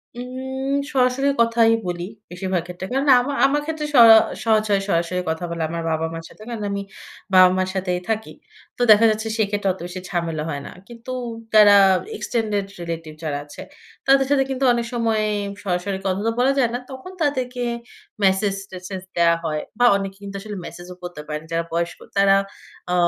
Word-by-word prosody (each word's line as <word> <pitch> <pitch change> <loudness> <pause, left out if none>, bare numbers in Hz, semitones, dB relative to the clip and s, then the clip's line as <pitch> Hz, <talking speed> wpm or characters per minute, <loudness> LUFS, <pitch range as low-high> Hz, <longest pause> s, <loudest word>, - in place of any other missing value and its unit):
উম 265 +2 -4 0.2
সরাসরি 255 +1 +2
কথাই 230 -1 +4
বলি, 175 -1 -3 0.3
বেশিরভাগ 180 0 -2
ক্ষেত্রে। 180 +1 -7
কেননা 270 +1 +4
আমা 280 +3 -3
আমার 290 +2 +2
ক্ষেত্রে 310 -1 -3
স - - 0 0.5
সহজ 220 -1 +3
হয় 200 -1 +3
সরাসরি 175 +1 0
কথা 160 +2 -3
বলা 170 -1 -3
আমার 165 0 -4
বাবা-মার 160 +1 -3
সাথে। - - -17
কারণ 225 -3 -5
আমি 200 0 -2 0.5
বাবা-মার 185 0 +5
সাথেই 180 -1 -1
থাকি। 220 0 -2 0.5
তো - - -5
দেখা 215 +2 +7
যাচ্ছে, 220 +1 -3
সেক্ষেত্রে 205 -2 0
অত - - -14
বেশি 185 +1 -7
ঝামেলা 165 -4 -2
হয় 140 -2 -4
না। - - -8 0.2
কিন্তু 235 +1 -9 0.4
যারা 210 -1 +8 0.4
extended 215 - -1 0.2
relative 165 -2 -6
যারা 145 -2 -2
আছে, 145 - -11 0.5
তাদের 270 0 +5
সাথে 275 -2 +4
কিন্তু 265 0 -2
অনেক 235 -1 -1
সময় 225 -2 +1 0.4
সরাসরি 190 0 -2
কথা 190 -1 0
তো - - +2
বলা 260 +2 +4
যায় 245 -3 +3
না। 245 - -1
তখন 265 +8 -9
তাদেরকে 255 -4 -1 0.6
মেসেজ-টেসেজ 190 -1 -1
দেয়া 170 -1 +4
হয় 155 -2 -2 0.2
বা 245 - +5
অনেকে 195 -1 -4
কিন্তু 200 0 -7
আসলে 210 -1 -7
মেসেজ 175 +1 -9
ও - - -16
পড়তে 175 -4 -7
পারেন 150 0 -4
না, - - -16
যারা 165 0 0
বয়স্ক। 170 0 -2 0.2
তারা, 195 0 +5 0.6
আ - - +1
200 Hz, 175 wpm, -22 LUFS, 175-245 Hz, 0.6 s, যারা